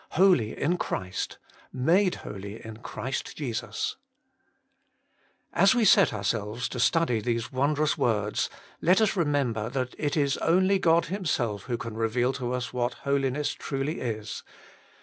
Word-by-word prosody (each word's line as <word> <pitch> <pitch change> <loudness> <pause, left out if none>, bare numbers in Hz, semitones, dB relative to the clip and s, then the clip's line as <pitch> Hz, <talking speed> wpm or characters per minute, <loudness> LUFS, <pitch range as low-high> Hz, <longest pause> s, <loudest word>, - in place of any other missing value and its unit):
Holy 175 - +4
in 175 +5 +1
Christ! 95 0 -3 0.3
Made 175 +9 +3
holy 100 +2 -7
in 110 -1 -8
Christ 125 +2 -5
Jesus! 115 -5 -3 1.6
As - - +5
we 235 -3 +3
set 195 -4 +6
ourselves 105 +3 -2
to 125 - -5
study 145 -3 +3
these 115 -1 -2
wondrous 145 +3 +1
words, 105 -3 +1 0.3
let 180 +4 +4
us 215 -2 +2
remember 140 - 0
that 130 -1 -2
it 150 0 -1
is 140 -2 +2
only 185 +3 +3
God 170 -2 +4
Himself 130 - -2
who 120 -2 -2
can 115 -1 -6
reveal 120 +3 +1
to 125 -2 -3
us 125 -1 -3
what 120 0 -1
Holiness 140 +1 0
truly 140 +3 -3
is. 110 -4 -4
130 Hz, 140 wpm, -27 LUFS, 115-155 Hz, 1.6 s, set